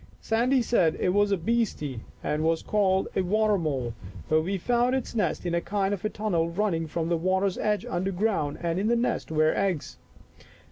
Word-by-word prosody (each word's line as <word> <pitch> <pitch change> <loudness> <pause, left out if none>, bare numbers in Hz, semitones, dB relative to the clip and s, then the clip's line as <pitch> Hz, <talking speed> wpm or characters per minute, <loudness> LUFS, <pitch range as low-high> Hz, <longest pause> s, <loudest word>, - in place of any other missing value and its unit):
Sandy 245 +3 +2
said 180 -9 +2
it - - +1
was 205 +2 +2
a 200 - +3
beastie 175 - -1 0.2
and 150 +1 -1
was 165 0 +1
called 190 -2 +1
a - - +2
water 210 +3 +2
mole, 135 -7 -2 0.4
but 155 0 +4
we 190 +5 -2
found 245 +6 +1
its 265 - -3
nest 200 -6 -1
in 175 - -1
a 170 - +1
kind 195 0 -1
of 195 - -4
tunnel 175 -6 0
running 170 -3 -1
from 165 +1 -2
the 170 0 +1
water's 190 +3 0
edge 210 -1 0
under 185 +2 -2
ground, 185 -7 0
and 170 +1 -1
in 205 - 0
the 235 - +3
nest 235 +1 -1
were 155 0 +3
eggs." 190 -6 -1
190 Hz, 195 wpm, -27 LUFS, 165-210 Hz, 0.4 s, but